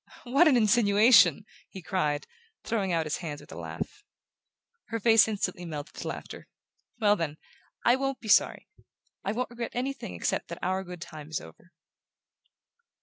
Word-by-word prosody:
"What 275 +7 +4
an 270 -5 +5
insinuation!" 210 - +5 0.2
he 190 - -10
cried, 150 -6 -1 0.4
throwing 205 -5 -1
out 165 -2 +1
his 155 - -2
hands 150 -4 -6
with - - -15
a - - -8
laugh. 420 - -7 0.8
Her 230 - -4
face 225 0 +6
instantly 195 -4 -2
melted 150 -4 -6
to - - -5
laughter. - - -7 0.5
"Well, 210 -2 +4
then 155 -5 -3 0.5
I 240 - +6
WON'T 270 0 -2
be 225 - -10
sorry; 210 - +3 0.6
I 195 - -1
won't 245 +3 -3
regret 235 -1 -6
anything 255 - -3
except 85 - -2
that - - -7
our 190 +1 0
good 180 -2 -9
time 155 -3 -9
is 160 - -2
over!" 80 - -15
200 Hz, 160 wpm, -28 LUFS, 165-235 Hz, 0.8 s, face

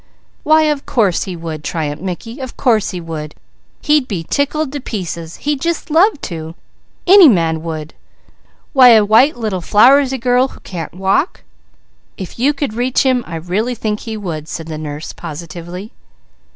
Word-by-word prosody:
"Why 315 +1 +4
of 300 -2 -1
course 205 -8 +1
he 185 - -5
would!" 160 -2 -6
triumphed 150 -3 -3
Mickey. 225 - -6
"Of 260 -2 -7
course 225 -6 +2
he 180 - -5
would! 155 -3 -7 0.5
He'd 295 -4 +3
be 180 -6 -3
tickled 285 0 -1
to 290 - -4
pieces! 170 - -5
He'd 290 -2 -2
just 340 -2 -2
love 345 +2 +4
to! 160 -1 -6 0.5
Any 370 -3 +8
man 165 -6 +1
would! 160 -2 -6 0.8
Why 260 -3 +8
a 215 -1 +5
white 240 +7 +4
little 215 -6 -2
flowersy 265 +8 +4
girl 250 +1 +2
who - - -15
can't 170 -2 -7
walk 195 - 0 0.4
!" - - -42 0.3
"If 190 +3 -8
you 270 +4 +3
could 285 -5 -3
reach 245 +3 +1
him, 255 -2 +2
I 170 - -6
really 190 +9 -2
think 210 -2 -2
he 225 -2 -6
would," 160 -7 -5
said 165 0 -6
the 155 -1 -6
nurse 150 0 -6
positively. 170 +5 -8
210 Hz, 170 wpm, -16 LUFS, 165-265 Hz, 0.8 s, Any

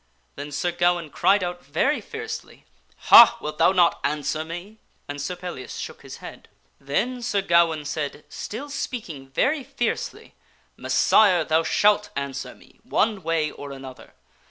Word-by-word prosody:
Then 145 +1 -7
Sir 175 +5 -1
Gawaine 175 -2 0
cried 200 -1 +3
out 175 0 -5
very - - 0
fiercely, 440 0 -8 0.2
" - - -35
Ha! 235 0 +10
wilt 150 -4 -6
thou - - +5
not 175 -3 +3
answer 150 +1 -1
me?" 175 +7 -9 0.3
and 145 0 -5
Sir 160 +6 -3
Pellias 175 -9 -7
shook - - -7
his - - -10
head. - - -11 0.3
Then 240 - -2
Sir 205 -5 -1
Gawaine 170 -4 +3
said, 145 0 -4
still 275 +7 -7
speaking 170 - -5
very 270 - +1
fiercely, 260 -2 -4 0.2
" - - -38
Messire! 185 -6 +4
thou 160 +1 +2
shalt 205 +5 +2
answer 140 -1 -5
me - - -22
one 210 -2 0
way 165 -2 0
or 145 -1 -9
another 135 -1 -11
175 Hz, 155 wpm, -24 LUFS, 150-210 Hz, 0.3 s, Ha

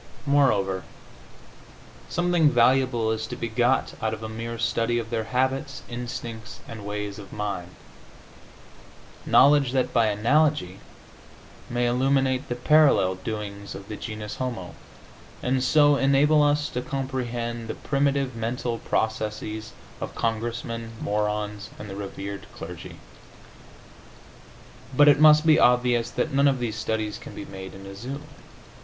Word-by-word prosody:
Moreover, 105 -10 +2 1.3
something 175 -3 +3
valuable 120 -2 +3
is 110 0 -2
to - - -5
be 115 - -3
got 120 +3 +1
out 110 0 0
of 110 - -11
a - - -3
mere 115 +1 -5
study 115 0 0
of 115 -1 -4
their 110 -2 -1
habits, 130 +2 -1
instincts 120 -1 -6
and 105 -3 -8
ways 105 0 -4
of 100 - -11
mind 100 -4 -4 1.5
knowledge 140 -2 +5
that, 130 -2 0
by 115 -2 +4
analogy, 115 - +2 0.9
may 120 0 0
illuminate 130 +2 +1
the 120 - -1
parallel 130 -8 +4
doings 100 +1 -6
of 100 +1 -10
the 105 - -4
genus 105 -1 -6
homo, 120 -9 -4 0.7
and 130 0 +1
so 145 +1 +5
enable 140 +3 +4
us 145 0 +2
to 125 - -3
comprehend 120 -4 -3
the - - -4
primitive 140 -2 0
mental 115 +1 -2
processes 110 0 -2 0.3
of - - -5
Congressmen, 115 0 -3
morons 105 0 -2
and 105 - -8
the - - -6
rev. 100 0 -6
clergy. - - -8 2.0
But 145 - +7
it 145 -1 +5
must 155 0 +7
be 155 -1 +6
obvious 125 -1 +3
that 155 - -2
none 140 +1 +4
of 135 -1 +3
these 120 -3 -3
studies 110 -1 -2
can - - -10
be - - -7
made 95 -1 -9
in 95 0 -11
a 100 - -8
zoo. 125 +8 -6
120 Hz, 135 wpm, -25 LUFS, 105-135 Hz, 2.0 s, But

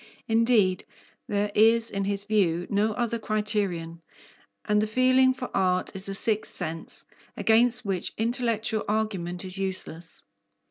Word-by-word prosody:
Indeed, 225 -5 +3 0.4
there 205 0 -1
is 225 +2 +4
in 195 0 -2
his 200 0 -2
view 185 -5 +1
no 210 +2 +1
other 235 0 -2
criterion, 200 -7 -2 0.6
and 210 0 +2
the 215 - 0
feeling 255 +3 +4
for 255 -1 -6
art 185 0 0
is 195 +1 -2
a 195 - -4
sixth 215 +1 -1
sense, 165 -2 -4 0.3
against 240 +2 +3
which 190 -3 -1
intellectual 230 -1 -1
argument 195 -4 -2
is 185 +1 -2
useless. 180 -4 -5
210 Hz, 135 wpm, -26 LUFS, 190-225 Hz, 0.6 s, is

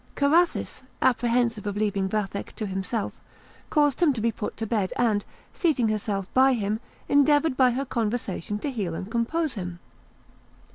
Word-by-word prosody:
Carathis, 320 +3 +2 0.2
apprehensive 235 -3 +1
of 205 0 -2
leaving 200 -2 0
Vathek 200 -1 -3
to 215 - -3
himself, 195 +3 -3 0.5
caused 295 0 +2
him 315 -5 +5
to 245 - -4
be 230 +1 +1
put 215 - -5
to 225 - -3
bed, 205 -4 0
and 215 -4 +2 0.3
seating 290 - +1
herself 205 -2 -1
by 265 +1 +5
him, 215 -2 -1 0.3
endeavoured 290 0 +4
by 255 -1 +5
her 260 +3 -1
conversation 215 -5 -2
to 280 +7 -3
heal 195 -9 -3
and 190 +5 -6
compose 275 +7 0
him. 180 -4 -5
230 Hz, 155 wpm, -26 LUFS, 205-265 Hz, 0.5 s, him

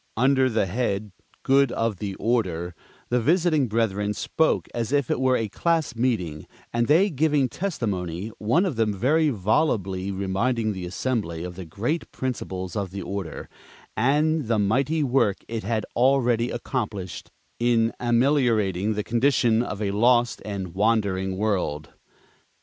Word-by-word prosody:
Under 130 +2 +3
the 110 -4 +1
head 105 0 -2 0.3
"Good 135 -1 +4
of 115 -3 -1
the 100 0 -4
Order" 95 -7 -1 0.4
the 125 0 +2
visiting 160 0 +2
brethren 105 -2 0
spoke 160 - 0
as 115 0 -2
if 140 -3 +1
it - - 0
were 130 -1 +3
a 110 - -1
class 160 - 0
meeting 100 -11 -1 0.3
and 120 0 +1
they 185 +7 +4
giving 150 -2 +2
"testimony," 105 - -3
one 140 - +2
of 160 -11 -2
them 110 -2 +1
very 150 +9 +2
volubly 100 - 0
reminding 105 +4 -1
the 90 -2 -5
assembly 90 -5 -2
of 90 0 -6
the 95 0 -7
great 120 - -3
principles 95 -8 -4
of 100 -3 -2
the 100 +2 -6
order, 95 -5 -5 0.5
and 150 +4 +2
the 115 -1 +2
mighty 135 +10 +1
work 125 -7 +1
it 115 -1 -3
had 110 +1 -1
already 120 -2 +3
accomplished 105 - -4 0.3
in 115 -1 +2
ameliorating 115 -6 +2
the 105 - -1
condition 120 -1 +2
of 105 -3 -4
a 100 - 0
lost 120 +3 +3
and 100 -3 -4
wandering 100 -2 +1
world. 90 -7 -1
115 Hz, 145 wpm, -24 LUFS, 100-130 Hz, 0.5 s, Good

